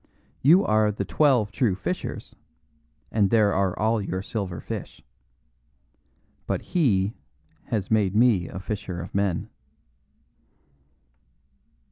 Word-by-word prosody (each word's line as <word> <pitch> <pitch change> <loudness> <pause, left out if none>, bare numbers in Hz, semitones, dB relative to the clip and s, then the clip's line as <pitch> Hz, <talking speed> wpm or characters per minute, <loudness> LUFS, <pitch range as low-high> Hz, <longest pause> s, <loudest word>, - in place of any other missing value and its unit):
You 175 +9 +6
are 110 0 +3
The 105 - -4
Twelve 130 -9 +2
True 110 -5 +1
Fishers, 95 - -5 0.8
and 105 -3 +2
there 105 -2 +3
are 95 -1 0
all 110 +1 +1
your 95 -1 -3
silver 100 -7 -4
fish. - - -7 1.4
But - - -2
He 110 - +2 0.5
has 105 -4 -3
made 105 -3 +2
me 110 -7 +4
a - - -8
fisher 95 -2 -5
of 85 - -8
men." 100 -3 -1
105 Hz, 110 wpm, -25 LUFS, 95-115 Hz, 1.4 s, You